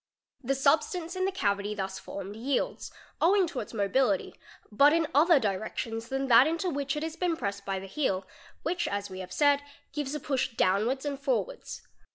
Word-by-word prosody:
The 270 Hz, +3 st, 0 dB
substance 320 Hz, +6 st, +1 dB
in 370 Hz, 0 st, 0 dB
the 385 Hz, -, +1 dB
cavity 205 Hz, -, -1 dB
thus 190 Hz, -1 st, -4 dB
formed 200 Hz, +1 st, -7 dB
yields, 255 Hz, +4 st, -2 dB, 0.3 s
owing 380 Hz, +3 st, +5 dB
to 315 Hz, -6 st, -5 dB
its 210 Hz, -, -6 dB
mobility, 245 Hz, +7 st, +1 dB, 0.4 s
but 280 Hz, +8 st, +6 dB
in 330 Hz, 0 st, +3 dB
other 315 Hz, +2 st, +6 dB
direc 210 Hz, -2 st, -2 dB
tions 225 Hz, 0 st, -3 dB
than 270 Hz, +1 st, -2 dB
that 245 Hz, +2 st, +7 dB
into 335 Hz, +3 st, -1 dB
which 280 Hz, -1 st, -2 dB
it 300 Hz, -, -3 dB
has 320 Hz, 0 st, -4 dB
been 345 Hz, -2 st, 0 dB
pressed 200 Hz, -4 st, -4 dB
by 195 Hz, -1 st, -1 dB
the 190 Hz, -, -6 dB
heel, 195 Hz, -3 st, -1 dB, 0.4 s
which, 345 Hz, 0 st, -1 dB
as 200 Hz, -6 st, -3 dB
have 185 Hz, -1 st, -7 dB
said, 285 Hz, -1 st, +3 dB, 0.3 s
gives 295 Hz, -1 st, -3 dB
a -, -, -2 dB
push 265 Hz, -3 st, -1 dB
downwards 225 Hz, +10 st, +1 dB
and 280 Hz, -2 st, -3 dB
forwards. 280 Hz, -, -2 dB
270 Hz, 190 wpm, -29 LUFS, 205-310 Hz, 0.4 s, that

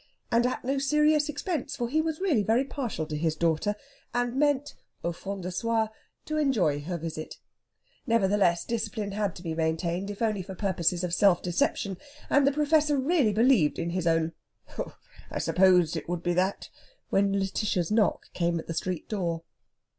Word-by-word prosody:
And 235 Hz, +1 st, +4 dB
at 255 Hz, -, -3 dB
no 270 Hz, +1 st, 0 dB
serious 300 Hz, +2 st, +3 dB
expense, 300 Hz, 0 st, -3 dB
for 240 Hz, -, -2 dB
he 310 Hz, +6 st, +1 dB
was 315 Hz, -1 st, -2 dB
really 345 Hz, -, +2 dB
very 225 Hz, +5 st, +2 dB
partial 250 Hz, -, -3 dB
to 155 Hz, -, -5 dB
his 155 Hz, +1 st, 0 dB
daughter, 170 Hz, +6 st, +1 dB, 0.4 s
and 245 Hz, 0 st, 0 dB
meant, 290 Hz, 0 st, +1 dB, 0.3 s
au 170 Hz, -, 0 dB
fond 195 Hz, +2 st, -6 dB
de 180 Hz, -, -3 dB
soi, 225 Hz, +3 st, 0 dB, 0.4 s
to 310 Hz, -, -2 dB
enjoy 215 Hz, -, +2 dB
her 175 Hz, +4 st, -4 dB
visit. 160 Hz, -1 st, -6 dB, 0.7 s
Nevertheless, 200 Hz, -6 st, +2 dB
discipline 215 Hz, -3 st, -3 dB
had 205 Hz, -2 st, -1 dB
to 175 Hz, -, -10 dB
be 165 Hz, -2 st, -3 dB
maintained, 170 Hz, +4 st, -1 dB
if 205 Hz, +2 st, -4 dB
only 215 Hz, -3 st, +1 dB
for 190 Hz, +1 st, -8 dB
purposes 180 Hz, -3 st, 0 dB
of 175 Hz, -1 st, -2 dB
self 185 Hz, -2 st, +4 dB
deception, 180 Hz, +2 st, 0 dB, 0.3 s
and 285 Hz, -1 st, +5 dB
the -, -, +5 dB
Professor 300 Hz, 0 st, +2 dB
really 275 Hz, -4 st, +2 dB
believed 220 Hz, -, +3 dB
in 170 Hz, 0 st, -2 dB
his 175 Hz, -1 st, -1 dB
own 165 Hz, 0 st, +2 dB, 0.4 s
"Humph! -, -, -6 dB, 0.3 s
I -, -, -4 dB
supposed 180 Hz, -3 st, +4 dB
it 160 Hz, -, -5 dB
would 175 Hz, -1 st, -2 dB
be 175 Hz, -, +1 dB
that," 185 Hz, +3 st, -1 dB, 0.4 s
when 195 Hz, 0 st, +3 dB
Lætitia's 195 Hz, -2 st, 0 dB
knock 215 Hz, -1 st, +1 dB
came 170 Hz, -1 st, 0 dB
at 160 Hz, -, -5 dB
the 165 Hz, -, -4 dB
street 180 Hz, 0 st, -3 dB
door. 170 Hz, -6 st, -2 dB
200 Hz, 180 wpm, -28 LUFS, 170-250 Hz, 0.7 s, and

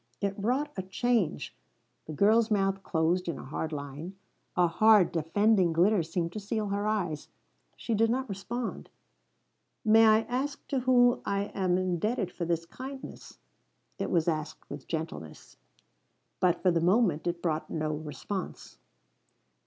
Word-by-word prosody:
It 200 Hz, -1 st, -1 dB
wrought 255 Hz, +9 st, -1 dB
a 190 Hz, -, -2 dB
change. 190 Hz, -4 st, -1 dB, 0.5 s
The -, -, -6 dB
girl's 215 Hz, +8 st, +3 dB
mouth 195 Hz, -2 st, +1 dB
closed 175 Hz, +1 st, 0 dB
in 170 Hz, -, -2 dB
a -, -, -9 dB
hard 155 Hz, +3 st, -4 dB
line. 145 Hz, +5 st, -6 dB, 0.4 s
A 180 Hz, -, +4 dB
hard, 210 Hz, +2 st, +5 dB
defending 180 Hz, +3 st, +2 dB
glitter 185 Hz, +4 st, +4 dB
seemed 165 Hz, +1 st, -2 dB
to 215 Hz, -, -4 dB
seal 210 Hz, 0 st, -2 dB
her 200 Hz, +1 st, -1 dB
eyes. 180 Hz, -8 st, -2 dB, 0.5 s
She 230 Hz, -, -3 dB
did 225 Hz, +1 st, +3 dB
not 260 Hz, +3 st, -1 dB
respond. 225 Hz, +4 st, -5 dB, 1.0 s
"May 225 Hz, +1 st, +6 dB
I 215 Hz, 0 st, +6 dB
ask 265 Hz, +5 st, -3 dB
to 270 Hz, -, 0 dB
whom 245 Hz, -1 st, +4 dB
I 200 Hz, +1 st, -2 dB
am 185 Hz, -2 st, +1 dB
indebted 185 Hz, +2 st, -1 dB
for 175 Hz, -, -4 dB
this 165 Hz, 0 st, -1 dB
kindness?" 265 Hz, +8 st, -9 dB, 0.6 s
It -, -, -2 dB
was 170 Hz, -2 st, +1 dB
asked 155 Hz, -2 st, -3 dB
with 145 Hz, -1 st, -8 dB
gentleness. 160 Hz, -, -6 dB, 0.8 s
But 180 Hz, -1 st, +2 dB
for 185 Hz, -, +5 dB
the 165 Hz, -1 st, +1 dB
moment 180 Hz, -3 st, +2 dB
it 170 Hz, 0 st, -3 dB
brought 160 Hz, -2 st, -1 dB
no 155 Hz, -1 st, -2 dB
response. 155 Hz, +5 st, -6 dB
190 Hz, 150 wpm, -29 LUFS, 165-220 Hz, 1.0 s, May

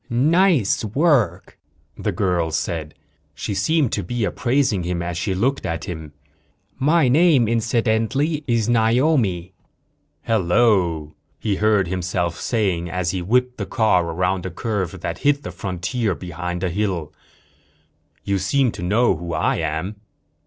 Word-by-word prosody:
"Nice 150 Hz, -, +3 dB
work," 110 Hz, -, +1 dB, 0.4 s
the 105 Hz, -, -2 dB
girl 90 Hz, -3 st, 0 dB
said. 80 Hz, -1 st, -3 dB, 0.4 s
She 100 Hz, -, -4 dB
seemed 155 Hz, +4 st, +1 dB
to -, -, -1 dB
be 120 Hz, -2 st, -3 dB
appraising 120 Hz, 0 st, +1 dB
him 85 Hz, 0 st, -2 dB
as 85 Hz, 0 st, -4 dB
she 95 Hz, +2 st, -1 dB
looked 130 Hz, +8 st, 0 dB
at 85 Hz, 0 st, -3 dB
him. 80 Hz, -4 st, -7 dB, 0.7 s
"My 150 Hz, +1 st, +3 dB
name, 145 Hz, -3 st, +4 dB
incidentally, 115 Hz, +6 st, 0 dB
is 115 Hz, -3 st, +1 dB
Naomi." 115 Hz, -, +2 dB, 0.7 s
"Hello," 90 Hz, -6 st, +2 dB, 0.3 s
he 100 Hz, -3 st, -1 dB
heard 105 Hz, -3 st, +2 dB
himself 90 Hz, -1 st, -2 dB
saying 95 Hz, -7 st, 0 dB
as 90 Hz, -1 st, -1 dB
he 95 Hz, -, -3 dB
whipped 125 Hz, +6 st, +1 dB
the -, -, -4 dB
car 110 Hz, -7 st, +2 dB
around 90 Hz, +2 st, -1 dB
a -, -, -4 dB
curve 95 Hz, -1 st, -3 dB
that -, -, -4 dB
hid 145 Hz, 0 st, +2 dB
the -, -, -6 dB
frontier 90 Hz, +4 st, -2 dB
behind 90 Hz, 0 st, -5 dB
a 90 Hz, -, 0 dB
hill. 90 Hz, -5 st, -2 dB, 1.1 s
"You 100 Hz, -1 st, 0 dB
seem 125 Hz, +7 st, +1 dB
to -, -, -9 dB
know 105 Hz, +4 st, +2 dB
who 85 Hz, +1 st, -6 dB
I -, -, +1 dB
am." 80 Hz, +6 st, -3 dB
100 Hz, 140 wpm, -21 LUFS, 90-120 Hz, 1.1 s, name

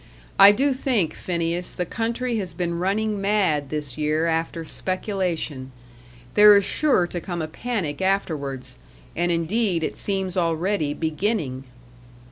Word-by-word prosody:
I 195 Hz, +1 st, +10 dB
do 270 Hz, +6 st, +1 dB
think, 235 Hz, -, 0 dB
Phineas, 170 Hz, 0 st, -3 dB
the 180 Hz, -, -2 dB
country 235 Hz, +4 st, -2 dB
has 190 Hz, -4 st, -5 dB
been 170 Hz, -2 st, -2 dB
running 205 Hz, +2 st, 0 dB
mad 195 Hz, -9 st, +1 dB
this 150 Hz, -3 st, -3 dB
year 155 Hz, +2 st, +1 dB
after 165 Hz, 0 st, -1 dB
speculation. 180 Hz, -8 st, -3 dB, 0.6 s
There 210 Hz, 0 st, +8 dB
is 200 Hz, -, +1 dB
sure 280 Hz, -12 st, +2 dB
to 175 Hz, 0 st, -5 dB
come 175 Hz, 0 st, -5 dB
a 160 Hz, -, -2 dB
panic 185 Hz, -5 st, -3 dB
afterwards, 140 Hz, -9 st, -2 dB, 0.4 s
and 175 Hz, +1 st, 0 dB
indeed 170 Hz, +1 st, 0 dB
it -, -, -2 dB
seems 190 Hz, -2 st, -3 dB
already 170 Hz, -2 st, 0 dB
beginning." 160 Hz, -, -2 dB
175 Hz, 135 wpm, -23 LUFS, 160-205 Hz, 0.6 s, I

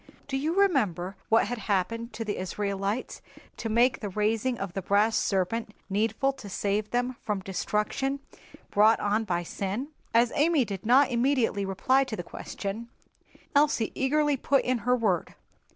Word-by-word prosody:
"Do 275 Hz, -, -3 dB
you 305 Hz, +5 st, 0 dB
remember 205 Hz, -, +1 dB
what 225 Hz, -, +5 dB
had 240 Hz, +3 st, -4 dB
happened 230 Hz, +5 st, 0 dB
to 225 Hz, +1 st, -4 dB
the 205 Hz, -, -2 dB
Israelites 200 Hz, +4 st, -3 dB, 0.4 s
to 225 Hz, -, -4 dB
make 240 Hz, +4 st, +3 dB
the 205 Hz, -, -4 dB
raising 220 Hz, +5 st, 0 dB
of 195 Hz, -4 st, -5 dB
the 195 Hz, -, -3 dB
brass 205 Hz, +4 st, +2 dB
serpent 210 Hz, +3 st, 0 dB, 0.2 s
needful 225 Hz, +7 st, +1 dB
to 215 Hz, -6 st, -10 dB
save 205 Hz, +2 st, -1 dB
them 245 Hz, 0 st, -1 dB
from 210 Hz, -3 st, -2 dB
destruction 210 Hz, +8 st, -1 dB, 0.5 s
brought 215 Hz, +2 st, +5 dB
on 210 Hz, +2 st, 0 dB
by 175 Hz, -3 st, -1 dB
sin?" 200 Hz, -, -4 dB, 0.2 s
As 235 Hz, +1 st, +4 dB
Amy 300 Hz, -3 st, +3 dB
did 200 Hz, 0 st, -6 dB
not 265 Hz, +2 st, +5 dB
immediately 235 Hz, -5 st, +1 dB
reply 255 Hz, +8 st, +2 dB
to 245 Hz, -4 st, -4 dB
the 175 Hz, -, -5 dB
question, 215 Hz, +6 st, -6 dB, 0.7 s
Elsie 285 Hz, -6 st, +3 dB
eagerly 290 Hz, +1 st, +1 dB
put 275 Hz, +1 st, +2 dB
in 250 Hz, -1 st, +1 dB
her 250 Hz, +3 st, +2 dB
word. 205 Hz, -8 st, 0 dB
225 Hz, 160 wpm, -28 LUFS, 200-255 Hz, 0.7 s, what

